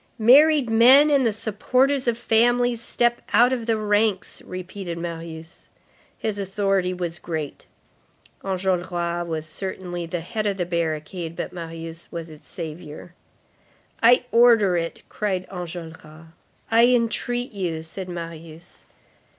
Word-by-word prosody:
"Married 280 Hz, +4 st, +6 dB
men 255 Hz, +7 st, +6 dB
and 275 Hz, -4 st, +4 dB
the -, -, +2 dB
supporters 255 Hz, +6 st, 0 dB
of 235 Hz, -1 st, +1 dB
families, 240 Hz, +1 st, +2 dB
step 240 Hz, 0 st, +1 dB
out 245 Hz, +2 st, +5 dB
of 240 Hz, -3 st, -3 dB
the 225 Hz, -1 st, +2 dB
ranks!" 210 Hz, -2 st, 0 dB
repeated 185 Hz, -1 st, -7 dB
Marius. 165 Hz, 0 st, -7 dB, 0.5 s
His 215 Hz, -2 st, -3 dB
authority 195 Hz, -1 st, 0 dB
was 175 Hz, -2 st, -4 dB
great. 155 Hz, -4 st, -5 dB, 0.8 s
Enjolras 175 Hz, -2 st, -1 dB
was 160 Hz, -2 st, -3 dB
certainly 175 Hz, 0 st, -5 dB
the 170 Hz, 0 st, -3 dB
head 215 Hz, +5 st, -3 dB
of 200 Hz, -1 st, -1 dB
the 175 Hz, -, -1 dB
barricade, 165 Hz, 0 st, -3 dB
but -, -, -5 dB
Marius 165 Hz, -1 st, -7 dB
was 165 Hz, -2 st, -6 dB
its 150 Hz, -1 st, -15 dB
savior. 160 Hz, 0 st, -8 dB, 0.9 s
"I 245 Hz, +2 st, +5 dB
order 230 Hz, -6 st, +5 dB
it," 165 Hz, -1 st, -3 dB
cried 190 Hz, -3 st, -2 dB
Enjolras. 165 Hz, -3 st, -9 dB, 0.4 s
"I 230 Hz, +1 st, +6 dB
entreat 245 Hz, 0 st, 0 dB
you," 175 Hz, -6 st, -3 dB
said 180 Hz, +3 st, -7 dB
Marius. 165 Hz, -1 st, -9 dB
185 Hz, 125 wpm, -23 LUFS, 170-230 Hz, 0.9 s, Married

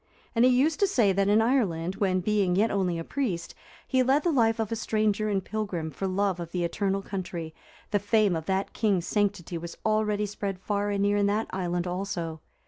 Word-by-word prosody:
And 230 Hz, 0 st, +3 dB
he 255 Hz, -, +7 dB
used 275 Hz, +5 st, +2 dB
to 400 Hz, -, +4 dB
say 235 Hz, -, +3 dB
that 195 Hz, +1 st, +1 dB
in 210 Hz, +2 st, +4 dB
Ireland, 190 Hz, -8 st, 0 dB
when, 185 Hz, -2 st, +1 dB
being 195 Hz, -2 st, +1 dB
yet 215 Hz, +4 st, +2 dB
only 185 Hz, -4 st, 0 dB
a 165 Hz, -, -4 dB
priest, 180 Hz, -9 st, -3 dB, 0.3 s
he 260 Hz, -, +2 dB
led 270 Hz, +4 st, +3 dB
the 345 Hz, -, +2 dB
life 225 Hz, -5 st, +2 dB
of 220 Hz, -1 st, -1 dB
a -, -, 0 dB
stranger 215 Hz, -1 st, 0 dB
and 195 Hz, -2 st, -1 dB
pilgrim 195 Hz, -7 st, -3 dB
for 195 Hz, -, -3 dB
love 190 Hz, -1 st, 0 dB
of 170 Hz, -1 st, -6 dB
the 180 Hz, -1 st, -1 dB
eternal 195 Hz, +3 st, -1 dB
country, 175 Hz, -5 st, -5 dB, 0.4 s
the 205 Hz, -, +2 dB
fame 205 Hz, -2 st, +2 dB
of 160 Hz, -1 st, -5 dB
that 190 Hz, +1 st, -1 dB
king's 200 Hz, -6 st, +1 dB
sanctity 200 Hz, -5 st, -1 dB
was 170 Hz, +1 st, -8 dB
already 215 Hz, -1 st, +1 dB
spread 200 Hz, -2 st, -4 dB
far 205 Hz, +2 st, -1 dB
and 200 Hz, -1 st, 0 dB
near 205 Hz, 0 st, +2 dB
in 200 Hz, 0 st, +3 dB
that 210 Hz, +2 st, 0 dB
island 175 Hz, -1 st, -1 dB
also. 175 Hz, -3 st, -4 dB
200 Hz, 215 wpm, -27 LUFS, 180-215 Hz, 0.4 s, he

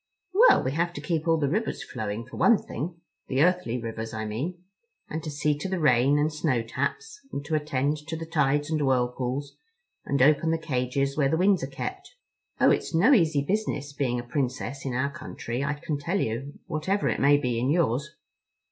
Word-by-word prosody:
"Well, 460 Hz, +6 st, +6 dB
we 130 Hz, -, -1 dB
have 170 Hz, +4 st, 0 dB
to -, -, -6 dB
keep 165 Hz, -1 st, -2 dB
all 165 Hz, 0 st, +4 dB
the 145 Hz, -3 st, +1 dB
rivers 215 Hz, +10 st, -1 dB
flowing, 110 Hz, +1 st, -4 dB
for 130 Hz, -, -11 dB
one 235 Hz, -, +5 dB
thing—the 160 Hz, -3 st, -4 dB
earthly 180 Hz, -9 st, +1 dB
rivers, 115 Hz, 0 st, -5 dB
I 110 Hz, 0 st, -3 dB
mean—and 175 Hz, -, -7 dB
to 155 Hz, -, -5 dB
see 150 Hz, 0 st, 0 dB
to 190 Hz, -, -3 dB
the 190 Hz, -, -1 dB
rain 135 Hz, -1 st, +4 dB
and 150 Hz, +1 st, +1 dB
snow 150 Hz, -6 st, 0 dB
taps, 435 Hz, -, -3 dB
and 140 Hz, -, -5 dB
to 160 Hz, -, -4 dB
attend 150 Hz, -1 st, 0 dB
to 160 Hz, -, -3 dB
the 165 Hz, -, -5 dB
tides 150 Hz, -2 st, +1 dB
and 155 Hz, -1 st, +1 dB
whirlpools, 130 Hz, +1 st, -1 dB, 0.5 s
and 140 Hz, -, -1 dB
open 150 Hz, +4 st, +4 dB
the 165 Hz, -, +2 dB
cages 135 Hz, -2 st, -1 dB
where 140 Hz, -3 st, +2 dB
the 160 Hz, -, +1 dB
winds 190 Hz, +2 st, +3 dB
are -, -, -2 dB
kept. -, -, -6 dB, 0.4 s
Oh, -, -, +6 dB
it's -, -, 0 dB
no 215 Hz, -, +6 dB
easy 160 Hz, -, +3 dB
business 145 Hz, -6 st, -2 dB
being 125 Hz, -4 st, -1 dB
a -, -, -5 dB
Princess 130 Hz, +1 st, -3 dB
in 125 Hz, -, -2 dB
our 140 Hz, +3 st, 0 dB
country, 135 Hz, -4 st, -5 dB
I 145 Hz, +1 st, -1 dB
can 145 Hz, 0 st, -4 dB
tell 170 Hz, +7 st, -1 dB
you, 130 Hz, +4 st, -3 dB
whatever 180 Hz, +6 st, -1 dB
it -, -, 0 dB
may 145 Hz, +1 st, +5 dB
be 125 Hz, -4 st, -1 dB
in 125 Hz, +3 st, 0 dB
yours. 145 Hz, -3 st, +1 dB
145 Hz, 200 wpm, -26 LUFS, 130-165 Hz, 0.5 s, Well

